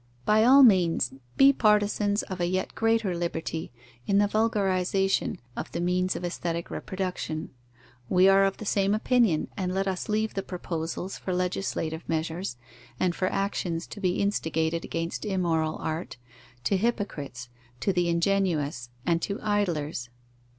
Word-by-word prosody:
By 215 +1 +4
all 270 +4 +8
means, 175 - +4 0.2
be 275 +1 +7
partisans 210 -2 +2
of 185 -2 -6
a 175 - +2
yet 185 +1 -1
greater 225 -4 +1
liberty 165 -2 -3 0.4
in 200 - +3
the 205 - +5
vulgarization 195 -3 +1 0.2
of - - -5
the - - -2
means 180 +1 +1
of 180 - -4
aesthetic 170 -1 -3
reproduction; 185 -4 -4 0.6
we 185 +1 +5
are 195 0 +6
of 195 0 +1
the 215 - -7
same 200 0 +2
opinion, 220 -7 +2
and 185 -3 -2
let 195 +1 -1
us 190 +1 -3
leave 215 +1 0
the 195 - -2
proposals 175 0 -4
for 185 - -2
legislative 180 -3 -2
measures, 160 -2 -2 0.4
and 180 -2 +2
for 185 - -1
actions 180 -4 -1
to 205 - -10
be 180 -2 +1
instigated 165 -4 0
against 165 0 -3
immoral 170 -6 0
art, 160 -3 -4 0.5
to 195 - +2
hypocrites, 160 - -3 0.3
to 195 - +1
the 175 -1 +1
ingenuous, 170 -8 0 0.2
and 170 -1 +2
to 200 +3 -3
idlers. 165 - -1
185 Hz, 150 wpm, -27 LUFS, 165-200 Hz, 0.6 s, all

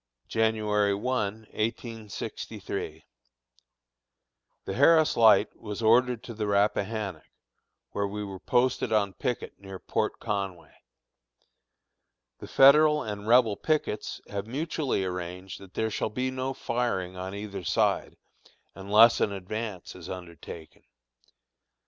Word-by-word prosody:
January 105 -2 +1
1, 105 -2 -1 0.2
1863. 115 -1 -5 1.6
The 95 - -3
Harris 155 +6 +5
Light 115 -2 +5
was 105 0 -6
ordered 120 +1 +4
to 120 - -7
the 105 -1 -3
Rappahannock, 100 -3 0 0.6
where 100 0 -1
we 105 +1 -5
were 95 -2 -7
posted 125 +1 +1
on 100 -3 +2
picket 125 +2 -4
near 95 -1 -8
Port - - -2
Conway. 100 -5 -4 1.7
The - - -9
Federal 150 +2 +6
and 105 -1 -6
Rebel 115 -3 +5
pickets 155 -4 -1
have 100 +1 -5
mutually 140 - -1
arranged 90 +1 -5
that 95 -1 -15
there 110 0 0
shall - - -1
be 125 +4 -2
no 130 +1 -3
firing 115 -7 -2
on 95 +1 -5
either 100 -2 -6
side, 80 -1 0 0.6
unless 105 +4 +5
an 100 - +2
advance 100 0 -5
is - - -10
undertaken. 85 -3 -9
105 Hz, 115 wpm, -28 LUFS, 95-120 Hz, 1.7 s, Federal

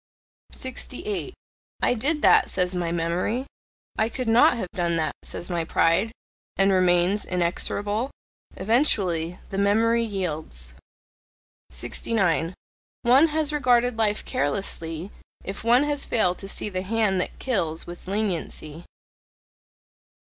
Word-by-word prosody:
68. 255 - -5 0.5
"I - - +4
did 295 +6 0
that," - - +6
says 180 -1 +1
my 175 -2 -1
memory. 175 +9 -1 0.5
"I 220 - +2
could 250 +1 -4
not 230 +1 +5
have 185 -6 -4
done 175 -3 0
that," 160 -1 0
says 175 - -5
my 175 -2 -1
pride, 165 +6 +2 0.5
and 195 0 +4
remains 185 +2 +3
inexorable. 205 +6 -1 0.5
Eventually 185 - +1
the 195 - -2
memory 225 +3 +3
yields. 155 - -4 1.0
69. 170 - -1 0.5
One 260 +7 +6
has 305 -1 +1
regarded 245 -4 +2
life 210 -1 +1
carelessly, 165 +3 -2 0.3
if 195 +2 -6
one 240 +4 +5
has 290 -1 -1
failed 180 -6 +2
to 195 - -7
see 205 - -2
the 185 -2 -3
hand 200 -2 +1
that - - -5
kills 170 -11 -1
with 175 +1 -10
leniency. 175 -5 -3
195 Hz, 120 wpm, -25 LUFS, 175-230 Hz, 1.0 s, that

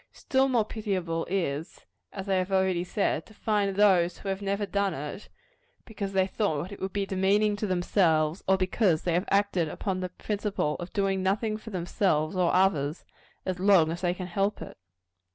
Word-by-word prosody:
Still 265 0 +1
more 240 -5 +2
pitiable 185 -7 -3
is 165 -4 -2
it, - - -24 0.3
as 195 0 -7
I 195 - +1
have 185 +1 0
already 190 -2 +2
said, 180 -3 -1
to 215 - -17
find 205 -3 0
those 185 -4 +4
who 195 - -6
have 195 +1 -2
never 200 +1 -1
done 200 -2 0
it, 150 +8 -7 0.6
because 200 -4 -5
they 190 -1 +3
thought 185 -4 -2
it 200 - -9
would 190 - -2
be 200 0 -1
demeaning 200 +2 +2
themselves 175 -4 +1
or 190 0 +4
because 185 -2 +1
they 175 - 0
have 180 +4 0
acted 195 -5 +2
upon 190 +3 -3
the 185 0 -3
principle 200 -5 -2
of 175 0 -7
doing 195 -2 0
nothing 210 +3 0
for 220 +1 -9
themselves 175 -4 0
or 180 -2 +2
others, 165 -5 +1 0.4
as 185 -1 -2
long 185 -5 +5
as 170 - -5
they 180 -1 0
can 185 - -5
help 195 +3 -1
it. - - -9
190 Hz, 190 wpm, -28 LUFS, 175-200 Hz, 0.6 s, long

